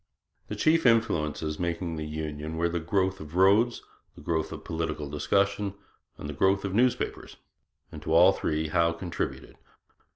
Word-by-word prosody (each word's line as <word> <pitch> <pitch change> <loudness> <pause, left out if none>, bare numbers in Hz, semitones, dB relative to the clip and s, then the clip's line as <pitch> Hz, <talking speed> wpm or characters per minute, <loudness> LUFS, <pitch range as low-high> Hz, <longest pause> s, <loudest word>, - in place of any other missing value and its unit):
The - - -5
chief 160 -2 +3
influences 80 -9 +1
making 85 -1 -2
for 80 - -5
union 75 0 -5
were 85 +1 +1
the 85 0 -2
growth 95 +3 0
of 75 +1 -10
roads, 100 +6 +4 0.3
the - - -13
growth 80 +1 -1
of - - -8
political 80 -2 -3
discussion, 100 +7 0 0.4
and - - -7
the 75 - -5
growth 95 +7 +2
of 95 - -3
newspapers; 125 +4 0 0.5
and 75 - -9
to 80 - -5
all 85 +4 +7
three 80 -4 -2
Howe 85 +1 +2
contributed. 85 +1 -5
85 Hz, 160 wpm, -27 LUFS, 75-100 Hz, 0.5 s, all